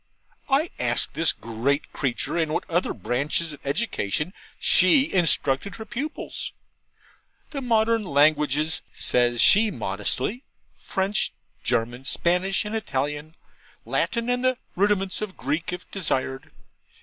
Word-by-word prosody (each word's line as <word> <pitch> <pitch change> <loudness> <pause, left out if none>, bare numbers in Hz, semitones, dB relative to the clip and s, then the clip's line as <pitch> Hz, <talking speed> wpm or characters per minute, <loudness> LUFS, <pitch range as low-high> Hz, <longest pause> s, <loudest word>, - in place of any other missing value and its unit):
I 280 +5 +2
asked - - +2
this 165 -1 +3
great 120 +6 -2
creature 135 +3 -1
in 160 -3 0
what - - -2
other 175 +2 0
branches 150 +5 -1
of 145 - -11
education 150 - -1 0.3
she 195 +10 +4
instructed 165 -2 +2
her 220 - -8
pupils? 280 +8 -5 1.0
'The 280 -3 -4
modern 230 -2 +2
languages,' 150 0 +2
says 120 -1 +3
she 215 - +6
modestly: 120 - -2 0.4
'French, 195 +2 0 0.3
German, 120 +3 -1
Spanish, 180 +7 +1
and 210 - -5
Italian, 150 -5 -3 0.5
Latin 235 -1 -1
and 245 0 0
the 255 -1 +2 0.2
rudiments 195 0 +1
of 210 -3 -5
Greek 150 +8 -2
if 180 0 -8
desired. 135 -5 -2
170 Hz, 120 wpm, -25 LUFS, 140-215 Hz, 1.0 s, she